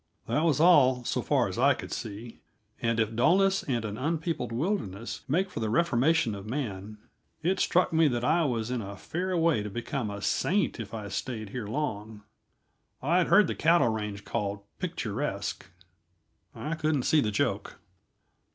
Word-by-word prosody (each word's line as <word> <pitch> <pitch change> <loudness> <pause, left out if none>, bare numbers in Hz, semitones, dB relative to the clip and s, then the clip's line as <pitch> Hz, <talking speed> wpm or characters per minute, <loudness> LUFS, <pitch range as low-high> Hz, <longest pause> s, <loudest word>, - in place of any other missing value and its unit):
That 155 - 0
was 155 -3 +2
all, 135 -7 +5
so - - -1
far - - +2
as - - -5
I - - +5
could - - -8
see, 110 +2 -6 0.4
and 115 -1 +1
if 110 0 0
dulness 190 - +3
and 120 -4 -2
an 105 0 -5
unpeopled 160 -3 -2
wilderness 115 - -3
make 185 +7 0
for - - -5
the 110 -1 -1
reformation 160 -2 +2
of 100 +1 -8
man, 110 -5 -4 0.5
it 185 +4 +1
struck 180 -1 +2
me 160 -1 +5
that 120 -3 -1
I 165 +7 +3
was 120 -3 -1
in 125 -2 -1
a 100 -1 -7
fair 180 - -2
way 165 -8 +3
to 105 - -5
become 120 +2 -3
a 100 0 -5
saint 185 - 0
if 110 -1 -6
I 105 -2 -5
stayed 110 +1 -4
here 125 -5 -5
long. 110 -5 -4 0.8
I 170 +6 +3
had 180 - +2
heard 210 0 +6
the - - -2
cattle 165 -6 +3
range 105 -2 -4
called 100 -3 -2 0.2
picturesque; 115 - -3 0.9
I 155 - -4
couldn't 155 -4 0
see 155 +3 +4
the 110 - 0
joke. 100 - -1
125 Hz, 175 wpm, -28 LUFS, 110-160 Hz, 0.9 s, heard